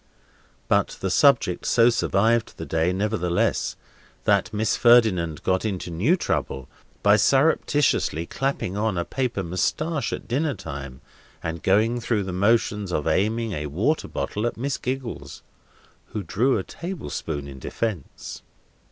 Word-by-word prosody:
But - - +1
the 95 - -2
subject 120 -8 +3
so 115 0 +5
survived 115 0 +1
all - - -4
day, 80 +2 +1
nevertheless, 95 -3 0 0.5
that - - +2
Miss 110 +1 0
Ferdinand 105 -10 +4
got 95 0 +1
into 95 -5 -3
new 110 - +2
trouble 65 - -2 0.4
by 105 +1 +6
surreptitiously 135 - +2
clapping 135 -5 -2
on 105 -2 0
a 85 - -1
paper 125 -7 -2
moustache 135 - -1
at - - -5
dinner 140 +3 0
time, 70 -2 -8 0.4
and 80 0 -4
going 110 +5 +2
through 115 -3 0
the 95 -1 -5
motions 105 0 +1
of 75 - -1
aiming 110 +3 +1
a 75 -5 -3
water 105 - 0
bottle 105 +3 -2
at - - -4
Miss 135 +3 -2
Giggles, 125 - -5 0.6
who 105 -2 -5
drew 120 +9 +1
a 95 - -2
table 175 - -7
spoon 70 -3 -4
in 65 -1 -9
defence. 100 - -5
105 Hz, 145 wpm, -24 LUFS, 90-120 Hz, 0.6 s, by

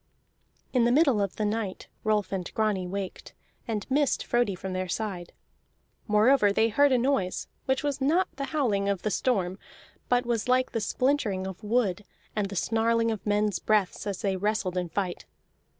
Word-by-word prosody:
In 250 -3 +4
the 240 - +3
middle 270 -6 +4
of 200 -2 -2
the 215 - -1
night 210 -2 -3 0.2
Rolf 215 -2 +1
and 185 -3 -3
Grani 210 -4 0
waked, 195 0 -6 0.3
and 215 -3 -2
missed 280 0 +1
Frodi 240 -5 +1
from 185 +1 -5
their 185 0 -2
side. 185 -3 -3 0.8
Moreover 210 +1 +4
they 220 +3 +3
heard 285 +6 +4
a 255 - +4
noise, 240 -8 0 0.2
which 265 +2 0
was 285 -2 -2
not 325 +8 +3
the 275 - -2
howling 220 -11 0
of 195 -3 -1
the 215 - 0
storm, 195 -8 0 0.5
but 245 0 +2
was 235 -1 -1
like 255 +1 +2
the 225 - -1
splintering 215 -5 0
of 190 +2 -7
wood 210 -3 +1 0.3
and 205 -2 0
the 200 - -6
snarling 230 +3 +1
of 210 -3 -4
men's 210 0 +1
breaths 210 -2 0
as 200 -2 -4
they 195 -2 +1
wrestled 205 -1 -1
in 180 -1 -1
fight. 180 - -3
215 Hz, 180 wpm, -27 LUFS, 195-245 Hz, 0.8 s, In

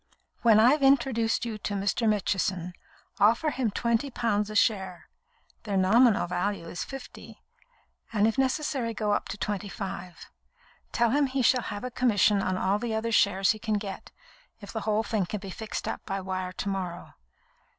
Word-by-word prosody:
"When 225 -3 +6
I've 260 +7 +5
introduced 245 -4 +2
you 220 -2 -5
to 205 - -3
Mr. 200 +3 0
Mitchison, 190 -3 -1 0.5
offer 235 +9 +3
him 255 -5 -1
twenty 235 +5 0
pounds 215 -4 -1
a 215 - -7
share 190 -4 0 0.5
(their 205 -3 -2
nominal 220 +5 +4
value 180 0 -2
is 175 - -4
fifty), 270 -1 -10 0.7
and 210 -2 +2
if 225 - +1
necessary 265 -3 -1
go 210 -1 -1
up - - 0
to 205 - -6
twenty 205 0 -3
five. 185 -3 -7 0.7
Tell 235 -1 +2
him 285 +1 +3
he 260 0 -1
shall 250 +2 +4
have 205 +2 -5
a 250 - -4
commission 210 -5 +3
on 185 -1 -1
all 195 +2 +1
the 230 -1 -2
other 225 +1 -2
shares 195 -3 +3
he 215 - -4
can 215 -1 -1
get, 200 -2 -5 0.5
if 200 -3 -10
the 220 - -3
whole 215 +1 +2
thing 210 -5 -1
can 210 - -4
be 195 -1 -8
fixed 220 +3 -5
up - - -4
by 195 -1 -2
wire 185 -1 -4
to 195 - -5
morrow. 180 -3 -5
210 Hz, 180 wpm, -27 LUFS, 195-235 Hz, 0.7 s, When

